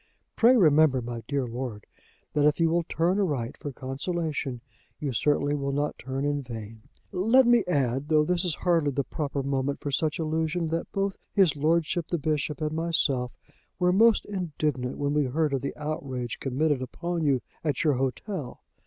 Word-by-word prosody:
Pray 250 +2 +6
remember, 155 - +5
my 120 -1 -5
dear 140 -3 0
Lord, 120 -3 -5 0.5
that 150 - +2
if 150 - +1
you 165 -1 +3
will 170 +1 +3
turn 170 +4 0
aright 145 - -1
for 145 - -6
consolation 140 0 -3 0.4
you 140 -4 -2
certainly 145 +4 +1
will 140 -1 -1
not 145 +2 -2
turn 135 +1 -3
in 145 0 0
vain. 115 -3 -8 0.3
"Let 225 +8 +4
me 240 -2 +5
add, 135 -4 0
though 155 -1 +4
this 175 +1 +1
is 175 -4 0
hardly 165 -5 +2
the 140 0 -1
proper 140 0 -3
moment 135 0 -1
for 145 - -4
such 150 +3 0
allusion, 160 +1 -1
that 165 +1 -3
both 195 -1 -1
his 190 -7 +4
lordship 160 +2 +1
the 175 - -1
Bishop 150 0 -2
and 155 0 0
myself 155 -6 0 0.4
were 180 +1 +3
most 225 +3 +5
indignant 155 -9 -2
when 145 0 -1
we 150 -1 +2
heard 150 +3 0
of 135 - 0
the 140 - -4
outrage 135 -5 -4
committed 140 +1 0
upon 170 +6 -3
you 135 -4 +2 0.2
at 150 -5 0
your 150 -3 +3
hotel. 135 - -3
150 Hz, 180 wpm, -27 LUFS, 135-165 Hz, 0.5 s, Pray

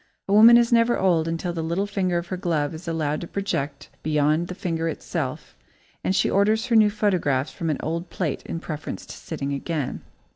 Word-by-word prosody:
A 195 - 0
woman 225 +3 +9
is 235 0 +3
never 230 +1 +4
old 170 -4 +2
until 165 +1 -2
the 165 - -3
little 170 +5 -1
finger 190 -3 0
of 170 - -2
her 185 - -2
glove 165 -5 -1
is 165 +3 -9
allowed 155 -2 -1
to 170 - -6
project 145 -9 -3
beyond 155 +2 +1
the 180 - -6
finger 165 -4 -2
itself - - -4 0.5
and 190 - +1
she - - +3
orders 215 +3 +2
her 245 -2 +1
new 215 -1 +6
photographs 180 -10 0
from 165 - -3
an 150 - 0
old 170 +3 -3
plate 165 -7 -2
in 165 - -4
preference 155 -2 -6
to - - -9
sitting 140 -3 -4
again. 145 0 -3
170 Hz, 205 wpm, -24 LUFS, 155-200 Hz, 0.5 s, woman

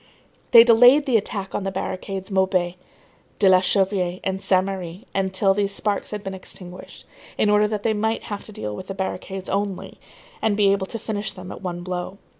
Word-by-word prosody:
They 230 -2 +10
delayed 245 +5 +6
the 260 -4 +1
attack 200 -2 -1
on - - -2
the 195 - -1
barricades 190 +1 -5
Maubuée, 190 -2 +1 0.6
de 200 - +4
la 185 -1 +7
Chanvrerie 185 -2 0
and 190 0 -2
Saint 185 -1 +2
Merry 190 +1 -6
until 195 0 +2
these 200 0 -1
sparks 205 -2 -2
had 210 -1 -6
been 195 - -5
extinguished, 185 -1 -9 0.3
in 210 - +3
order 210 0 +4
that 210 -1 -3
they 225 - +2
might 220 +2 -1
have 205 -1 -6
to - - -8
deal 105 - -5
with 185 - -8
the 195 - -5
barricades 190 0 -4
only 200 -1 -3 0.4
and 215 -2 +1
be 200 -2 +4
able 195 -1 0
to 230 - -4
finish 215 -2 -4
them 185 -1 -9
at - - -9
one 175 -2 -4
blow. 180 +1 -4
195 Hz, 200 wpm, -23 LUFS, 185-210 Hz, 0.6 s, They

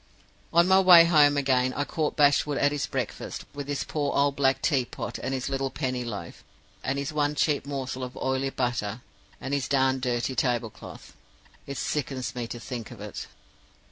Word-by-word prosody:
"On 170 +1 +5
my 190 0 +6
way 180 -3 +9
home 150 -4 +5
again, 130 -2 +2
I 145 - 0
caught 150 +1 -2
Bashwood 145 0 +3
at 145 - +3
his 145 -1 -2
breakfast, - - -4
with 145 -1 -6
his 145 -1 -2
poor 145 -2 -2
old 140 0 +2
black 135 -1 +2
tea 135 -6 +2
pot, - - -6
and - - -3
his 130 -1 -2
little 135 0 -1
penny 130 -3 -2
loaf, 110 -4 -7 0.4
and 135 +1 -1
his 140 +2 -3
one 150 0 0
cheap 145 -1 +1
morsel 130 -2 -4
of 125 0 -7
oily 130 +1 -1
butter, 120 -4 -2 0.4
and 135 - -4
his 140 -2 0
darned 130 -1 +2
dirty 125 0 -1
tablecloth. 120 -4 -3 0.5
It 140 -1 -5
sickens 135 -4 -2
me 120 -2 -4
to 120 - -7
think 120 -3 -6
of - - -11
it. - - -7
135 Hz, 185 wpm, -27 LUFS, 125-145 Hz, 0.5 s, way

